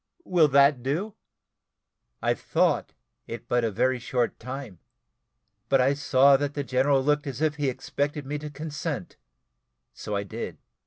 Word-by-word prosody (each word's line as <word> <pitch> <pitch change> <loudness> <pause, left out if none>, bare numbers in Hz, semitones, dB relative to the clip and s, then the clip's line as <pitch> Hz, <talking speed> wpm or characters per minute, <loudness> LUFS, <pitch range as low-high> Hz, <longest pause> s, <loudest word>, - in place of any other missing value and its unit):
Will 170 -4 +4
that 140 -1 +5
do?" 165 - -2 1.1
I - - +3
thought - - 0 0.3
it 115 - -7
but 120 0 +1
a 115 - +1
very 125 +5 +1
short 125 0 -1
time, 125 -6 -7 0.9
but 135 - +4
I 130 +2 +4
saw 140 -1 +5
that 145 +1 -3
the 145 - -1
general 135 +1 +2
looked 150 +1 +1
as 135 -2 -5
if 155 -1 0
he 145 -2 +1
expected 140 +3 -3
me 145 +2 -3
to 150 0 -6
consent; 150 - -5 0.8
so 105 - -5
I 100 - -1
did. 100 - -6
140 Hz, 155 wpm, -26 LUFS, 125-145 Hz, 1.1 s, that